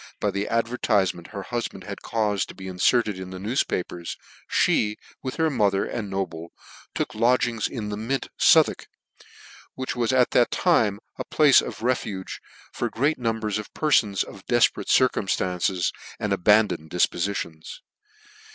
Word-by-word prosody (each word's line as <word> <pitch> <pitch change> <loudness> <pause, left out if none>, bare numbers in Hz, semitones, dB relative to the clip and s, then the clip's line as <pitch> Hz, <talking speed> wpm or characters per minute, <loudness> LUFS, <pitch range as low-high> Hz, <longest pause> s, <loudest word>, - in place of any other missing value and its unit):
by - - 0
the 100 +1 -2
advertifement 105 -7 0
her 100 -2 -7
hufband 120 -1 -3
had - - -7
caufed 105 -4 -1
to - - -11
be 95 -1 -9
inferted 100 +2 +1
in 95 0 -7
the 95 - -7
news 110 +8 0
papers, 85 -1 -4 0.5
me, 105 -1 +1 0.3
with 130 - -4
her 160 -1 +2
mother, 100 -6 +2
and 110 -4 -4
Noble, 85 -4 -4 0.5
took - - -2
lodgings 120 0 +2
in 110 -4 -5
the 105 - -4
Mint, 125 +6 -2
Southwark, - - +4 0.9
which 130 0 -4
was 120 -1 0
at 125 -1 +3
that 120 - +4
time 115 - +2 0.2
a - - -1
place 150 -3 +5
of - - -7
refuge 110 -6 -2 0.3
for - - -2
great 140 +6 0
numbers 110 -3 -1
of 105 - -8
perlbns 110 - +2
of 100 -2 -12
defperate 120 -1 +2
circumftances 95 -7 +1 0.3
and 105 -2 -1
abandoned 100 -4 +3
difpofitions. 85 -2 -1
105 Hz, 150 wpm, -24 LUFS, 95-120 Hz, 0.9 s, place